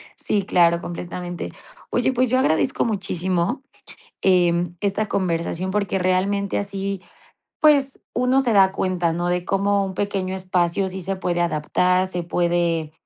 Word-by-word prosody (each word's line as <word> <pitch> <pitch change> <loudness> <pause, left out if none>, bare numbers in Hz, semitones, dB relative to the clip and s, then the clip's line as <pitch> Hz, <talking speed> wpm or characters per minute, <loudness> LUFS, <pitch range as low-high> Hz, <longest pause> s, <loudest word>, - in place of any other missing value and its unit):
Sí, 205 -2 -1
claro, 170 -3 +3
completamente. 175 0 -6 0.4
Oye, 250 +2 +1
pues, 255 0 +1
yo 255 +2 +2
agradezco 260 +4 +1
muchísimo, 190 - -1 0.6
em, 175 -2 +2
esta 205 +1 0
conversación, 180 -1 -1
porque 200 -1 0
realmente 190 +2 0
así, 195 -1 -3 0.6
pues, 280 -3 +3
uno 250 +2 +2
se 245 -4 +1
da 195 -2 +5
cuenta, 180 -3 0
¿no?, 175 +1 -2
de 180 0 -1
cómo 200 +1 +1
un 190 - -5
pequeño 190 -1 -2
espacio 185 0 0
sí 190 +1 -6
se 195 +2 -2
puede 175 -2 -1
adaptar, 180 +3 +1
se 180 -2 -3
puede 170 -2 0
185 Hz, 140 wpm, -22 LUFS, 175-200 Hz, 0.6 s, da